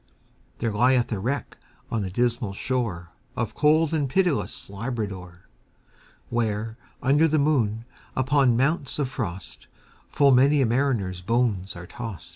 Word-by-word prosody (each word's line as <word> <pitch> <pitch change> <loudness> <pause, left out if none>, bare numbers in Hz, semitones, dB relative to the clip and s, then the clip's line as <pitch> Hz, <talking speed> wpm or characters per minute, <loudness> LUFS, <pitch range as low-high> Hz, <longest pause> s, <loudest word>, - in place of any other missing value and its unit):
There 115 -2 -2
lieth 125 +3 +3
a 105 - -1
wreck 130 +7 -3 0.3
on 115 - 0
the 95 - -3
dismal 120 0 0
shoreOf 110 -1 -4
cold 155 +3 +3
and 145 -4 0
pitiless 145 - 0
Labrador; 100 -5 -5 0.8
Where, 110 -1 -2 0.2
under 145 +5 +4
the 155 0 +1
moon, 120 -7 +1 0.3
upon 130 -2 +3
mounts 140 +2 0
of 140 -4 -1
frost, 95 -10 -6 0.4
Full 140 -1 +4
many 135 +3 +5
a 135 - +4
mariner's 115 -7 0
bones 105 -2 0
are 90 0 -8
tost. 110 -2 -7
120 Hz, 130 wpm, -25 LUFS, 105-135 Hz, 0.8 s, many